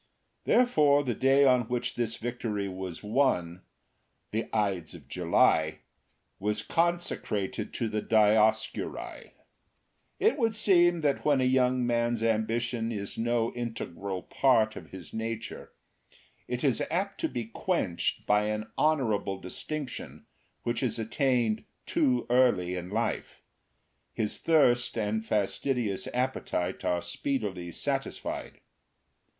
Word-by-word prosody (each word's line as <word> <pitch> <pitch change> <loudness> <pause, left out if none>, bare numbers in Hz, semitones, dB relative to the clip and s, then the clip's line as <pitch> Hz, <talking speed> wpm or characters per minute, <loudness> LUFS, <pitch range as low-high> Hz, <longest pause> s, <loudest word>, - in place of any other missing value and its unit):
Therefore 150 - +4
the 125 -3 -1
day 135 +3 +4
on 125 -3 +4
which 125 0 -1
this 115 -1 -2
victory 115 -4 -3
was 95 -2 -6
won, 105 -7 +1 0.7
the 110 +2 -2
Ides 95 -7 -1
of 75 -6 -13
July, 80 -1 +2 0.6
was 105 +2 -1
consecrated 170 - -1
to 115 - -1
the 110 -1 -2
Dioscuri. 110 0 +1
IV. - - -22 0.9
It 395 -5 +3
would 225 -2 +1
seem 175 -5 +4
that 145 -2 +1
when 145 -3 +3
a - - +2
young 130 -1 +3
man's 120 -1 +1
ambition 115 +1 0
is 100 -2 -4
no 120 0 +1
integral 100 -6 -5
part 115 -5 +2
of - - -9
his 90 -5 -9
nature, 115 0 -5 0.8
it 125 0 -3
is 135 -5 +2
apt 195 +4 -2
to - - 0
be 120 -3 -3
quenched 110 - -1
by 105 0 +3
an 110 +1 -3
honourable 115 -11 +1
distinction 140 - -6 0.4
which 120 0 -1
is 125 -3 0
attained 115 -1 +1 0.2
too 285 -7 +1
early 120 -8 +3
in 90 0 -5
life; 110 +4 -3 0.7
his 105 -1 -2
thirst 125 -8 +3
and 110 0 -1
fastidious 110 0 -1
appetite 125 -8 -2
are 90 -1 0
speedily 100 -11 -3
satisfied. - - -4
115 Hz, 120 wpm, -29 LUFS, 105-130 Hz, 0.9 s, Therefore